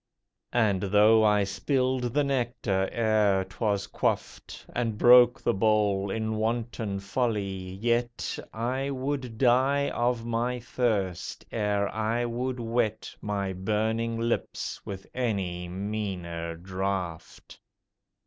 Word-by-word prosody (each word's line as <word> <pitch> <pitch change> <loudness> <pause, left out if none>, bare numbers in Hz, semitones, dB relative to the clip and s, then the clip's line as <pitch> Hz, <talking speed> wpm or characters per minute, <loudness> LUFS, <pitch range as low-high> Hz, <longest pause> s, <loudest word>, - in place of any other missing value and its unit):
And 105 -6 +3
though 105 +3 +5
I 105 -1 +4
spilled 125 +4 0
the 145 - +4
nectar 120 -8 0
ere 105 -4 +2
'twas 100 +2 -1
quaffed, - - -3
And 115 -3 -1
broke 125 +2 +7
the - - +1
bowl 100 -1 +2
in 110 +1 -2
wanton 110 -2 -2
folly, 100 -4 -2
yet 120 +3 -1
I 130 +5 -2
would 130 -3 -3
die 135 +3 +3
of 120 -1 0
my 120 +2 -1
thirst 110 -7 -2
ere 105 -2 0
I 110 +2 0
would 125 +2 -2
wet 115 -2 -1
My 100 -2 -2
burning 110 +4 -1
lips 115 +1 -2
with 95 -1 -7
any 95 -8 -2
meaner 90 -4 -4
draught. 95 -1 -4
110 Hz, 110 wpm, -28 LUFS, 100-120 Hz, -, broke